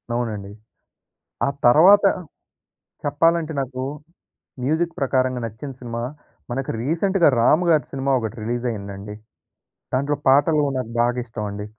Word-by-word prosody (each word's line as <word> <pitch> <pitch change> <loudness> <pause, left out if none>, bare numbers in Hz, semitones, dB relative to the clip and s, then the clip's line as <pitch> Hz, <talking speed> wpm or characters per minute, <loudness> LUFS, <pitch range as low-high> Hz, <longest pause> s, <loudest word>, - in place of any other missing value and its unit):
అవునండి. 105 -5 -3 1.0
ఆ - - +2 0.2
తర్వాత 180 +12 +7 1.0
చెప్పాలంటే 165 +3 +2
నాకు 130 -1 -4 0.8
మ్యూజిక్ 160 +5 0
ప్రకారంగా 130 -2 +1
నచ్చిన 115 +6 -8
సినిమా 115 -1 -5 0.5
మనకు 135 +2 -3
రీసెంట్‌గా 170 +5 +2
రామ్ 155 +9 +4
గారి 155 -3 +3
సినిమా 135 0 -1
ఒకటి 115 +1 -5
రిలీజ్ 120 +2 -2
అయిందండి. 100 0 -7 0.8
దాంట్లో 140 +3 0
పాటలు 150 +3 +4
నాకు 125 -3 -4
బాగా 120 +1 +1
ఇష్టమండి. 105 -3 -5
130 Hz, 110 wpm, -22 LUFS, 115-150 Hz, 1.0 s, తర్వాత